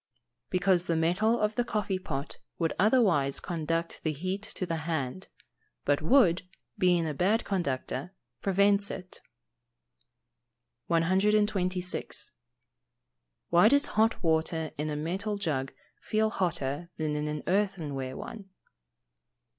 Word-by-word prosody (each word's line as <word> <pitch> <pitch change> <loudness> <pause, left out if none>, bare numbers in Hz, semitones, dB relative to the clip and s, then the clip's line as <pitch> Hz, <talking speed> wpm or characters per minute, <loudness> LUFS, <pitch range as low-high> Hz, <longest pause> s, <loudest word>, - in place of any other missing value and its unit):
_ - - -55
Because 185 -1 +2
the 170 - 0
metal 180 +8 +2
of 210 0 +1
the 245 - +1
coffee 210 -5 -1
pot 140 -5 -5 0.2
would 165 -2 0
otherwise 190 - +3
conduct 165 0 -2
the 155 - +1
heat 185 +7 -3
to 185 - -2
the 165 -2 -2
hand; 160 0 -3 0.6
but 145 +1 +2
wood, 180 - +4 0.3
being 175 -2 +3
a 155 - -2
bad 200 - +1
conductor, 140 -4 -2 0.3
prevents 200 +1 +3
it. 185 -1 -8 1.7
126. 185 +1 +1 1.2
_Why 175 +5 +7
does 285 +2 +4
hot 220 -1 +1
water 160 -1 +1
in 150 +1 -3
a 150 - -2
metal 190 +7 -2
jug 145 -9 -1 0.3
feel 215 0 +1
hotter 170 -4 -2
than 155 -1 -1
in 150 0 -2
an 150 -1 -4
earthenware 165 -10 -1
one? 210 -4 -8
180 Hz, 125 wpm, -29 LUFS, 155-200 Hz, 1.7 s, Why